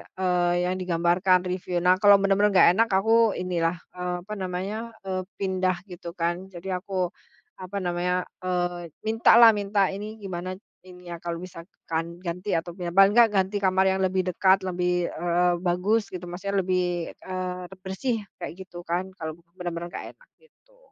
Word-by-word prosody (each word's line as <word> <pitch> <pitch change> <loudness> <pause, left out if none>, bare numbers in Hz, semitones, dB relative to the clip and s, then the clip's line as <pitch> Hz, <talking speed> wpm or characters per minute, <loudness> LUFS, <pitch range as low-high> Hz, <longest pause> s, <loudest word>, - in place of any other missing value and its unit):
eee, 180 -2 +1
yang 180 +1 0
digambarkan 180 +1 +2
review, 180 -1 -2
nah, 180 0 +6
kalau 205 -1 +8
bener-bener 200 +1 +3
nggak 185 - +7
enak, 230 0 +3
aku 225 +2 +4
ini 180 -1 -3
lah, 165 +1 +2 0.2
apa 180 +2 -4
namanya, 195 +5 -4
eee, 185 -1 -3 0.2
pindah 185 -1 +1 0.2
gitu 170 -1 -8
kan, 175 +2 -1
jadi 185 +2 -4
aku 185 -2 -2 0.5
apa 185 +2 -6
namanya, 180 0 0 0.2
eee, 175 -2 -2
minta 225 +1 +3
lah, 230 - +11
minta 200 -1 +1
ini 210 +3 -6
gimana 185 -1 -5 0.3
ini 180 -1 -13
ya, 170 - -5
kalau 170 0 -5
misalkan 170 -1 -6
ganti 180 +4 -3
atau 165 +1 -2
pindah, 175 -2 -4
paling 195 0 +7
enggak 235 -2 +8
ganti 195 +1 +1
kamar 190 0 +2
yang 190 - -1
lebih 185 0 0
dekat, 190 +2 +3
lebih, 180 -1 0
eee, 175 +1 +1
bagus 185 +5 +1
gitu, 180 -1 -6
maksudnya, 195 +2 -1
lebih, 180 -2 -1
eee, 185 -1 -5 0.2
bersih 215 +4 -2 0.2
kayak - - -5
gitu 180 -2 -10
kan, 180 +3 -1
kalau 160 -1 -5 0.2
bener-bener 175 -1 -4
nggak - - -6
enak, - - -26
gitu. - - -28
185 Hz, 165 wpm, -26 LUFS, 175-195 Hz, 0.5 s, lah